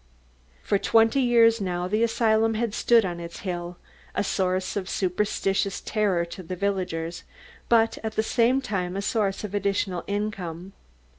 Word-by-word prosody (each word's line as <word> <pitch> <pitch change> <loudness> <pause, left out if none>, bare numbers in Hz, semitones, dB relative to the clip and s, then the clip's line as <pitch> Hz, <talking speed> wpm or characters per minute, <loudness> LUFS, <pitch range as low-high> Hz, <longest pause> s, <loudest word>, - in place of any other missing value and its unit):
For 200 - +1
twenty 225 +5 +3
years 230 -3 +4
now, 180 -2 -2
the 215 +4 0
asylum 225 -1 +2
had 225 -1 -1
stood 230 -2 +4
on 175 -2 -4
its 170 0 -8
hill, 175 -2 -4 0.4
a - - +1
source 185 -1 -1
of 195 -2 -3
superstitious 195 +1 0
terror 200 -6 0
to 170 +2 -9
the 185 +1 -6
villagers, 180 -4 -2 0.5
but 225 -1 +3
at 220 0 -3
the 220 - +1
same 245 +4 +2
time 185 -6 -3
a 200 - -2
source 200 -1 0
of 205 -2 -5
added 200 -1 0 0.3
income. 195 -3 -4
200 Hz, 155 wpm, -25 LUFS, 180-220 Hz, 0.5 s, years